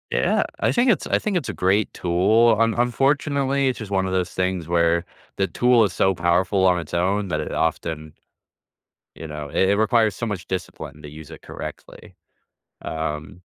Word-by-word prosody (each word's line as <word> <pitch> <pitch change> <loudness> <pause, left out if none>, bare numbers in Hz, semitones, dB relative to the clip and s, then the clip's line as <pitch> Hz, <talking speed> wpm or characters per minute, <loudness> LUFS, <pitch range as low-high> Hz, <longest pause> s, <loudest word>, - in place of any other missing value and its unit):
Yeah, - - +1 0.2
I - - +2
think 245 +1 +3
it's - - -1
I - - +1
think 205 -3 -1
it's 155 - -3
a - - -4
great 95 +3 +1
tool. 110 +6 +3
Un 115 0 +3
unfortunately, 140 +2 +1
it's 130 - -4
just 105 -3 -8
one 95 -1 +1
of 95 - -3
those 90 -1 -1
things 90 -3 -2
where 85 0 +2 0.3
the 95 - +1
tool 120 +1 +3
is 95 - -3
so 95 - +2
powerful 90 +3 +1
on 90 -1 +3
its 80 - -9
own 95 +3 0
that 75 -3 -1
it - - -4
often 80 -1 -2 1.0
you 80 - -8
know, 75 -1 -7
it 95 - +1
it - - +3
requires 110 -1 +2
so 115 - -4
much 105 -5 -5
discipline 80 -5 -6
to 75 - -9
use 75 +1 -12
it - - -11
correctly. - - -10 0.7
Um, 80 +2 -5
95 Hz, 190 wpm, -22 LUFS, 85-115 Hz, 1.0 s, think